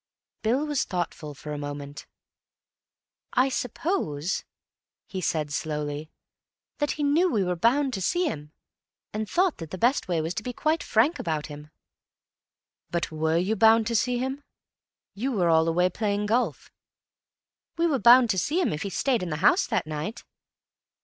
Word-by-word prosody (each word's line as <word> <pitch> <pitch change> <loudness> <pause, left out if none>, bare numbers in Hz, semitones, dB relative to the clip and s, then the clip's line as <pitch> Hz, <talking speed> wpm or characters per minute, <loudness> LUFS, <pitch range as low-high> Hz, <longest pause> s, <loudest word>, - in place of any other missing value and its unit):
Bill 250 +7 +1
was 295 -3 0
thoughtful 165 -4 -4
for 150 +2 -7
a 145 - -4
moment. 145 -1 -7 1.3
"I 260 +2 +3
suppose," 220 - -2 0.6
he 190 - -5
said 155 -4 -1
slowly, 150 0 -3 0.7
"that 290 -1 +1
he 300 - -3
knew 315 +6 +3
we 210 -6 +2
were 180 -1 -1
bound 255 - +2
to 190 - -3
see 350 - +1
him, 150 - -4 0.6
and 215 0 -3
thought 365 -1 +2
that 165 -2 -7
the 185 - -6
best 240 +6 +2
way 175 -3 0
was 160 +2 -2
to 180 - -3
be 245 +3 -5
quite 310 +5 0
frank 280 +10 +2
about 155 -3 -2
him." 150 +1 -11 1.2
"But 170 -2 -2
were 160 +1 0
you 190 +6 +1
bound 225 +1 +5
to 230 +1 -1
see 245 +3 +1
him? 265 +3 -3 0.7
You 255 +6 -2
were 180 -6 +2
all 160 0 +4
away 175 +2 +3
playing 205 +2 -1
golf." 215 - -1 1.1
"We 335 - +2
were 295 -6 +2
bound 240 -1 +7
to 190 - +1
see 305 - 0
him 355 - +1
if 150 - -4
he 200 - -3
stayed 245 +4 0
in 180 - -3
the 150 - -2
house - - +5
that - - 0
night." 155 +7 -5
200 Hz, 170 wpm, -26 LUFS, 160-255 Hz, 1.3 s, bound